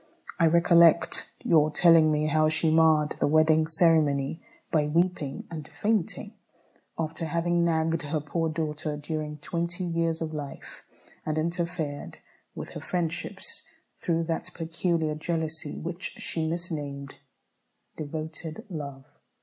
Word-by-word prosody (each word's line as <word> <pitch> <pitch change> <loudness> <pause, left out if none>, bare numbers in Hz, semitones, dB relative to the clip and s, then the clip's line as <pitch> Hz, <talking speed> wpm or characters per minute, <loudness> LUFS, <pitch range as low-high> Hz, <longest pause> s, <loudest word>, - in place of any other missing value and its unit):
I 165 - +5
recollect 170 0 +4
your 155 -2 +4
telling 165 0 +6
me 150 0 +1
how 155 0 +3
she 160 0 +2
marred 155 -2 +4
the - - +2
wedding 155 +1 +4
ceremony, 160 -3 +3 0.3
by 150 -2 +2
weeping 165 -3 0
and 155 -3 -6
fainting, 210 -4 -1 0.6
after 160 0 -3
having 170 +2 +1
nagged 165 0 +1
her 150 +1 -2
poor 160 +2 -2
daughter 155 -1 -3
during 150 0 -4
twenty 170 +4 -3
years 165 -1 0
of 160 -1 -4
life, 145 -2 -7 0.4
and 155 0 -2
interfered 170 -3 -2 0.4
with - - -6
her - - -8
friendships, 170 -2 -3 0.4
through 165 -2 0
that 165 0 -2
peculiar 165 -1 -1
jealousy 160 -1 -3
which 170 +3 -4
she 160 -1 -2
misnamed 150 -5 -3 0.8
"devoted 155 +1 -6
love." 140 -4 -6
160 Hz, 125 wpm, -27 LUFS, 155-170 Hz, 0.8 s, telling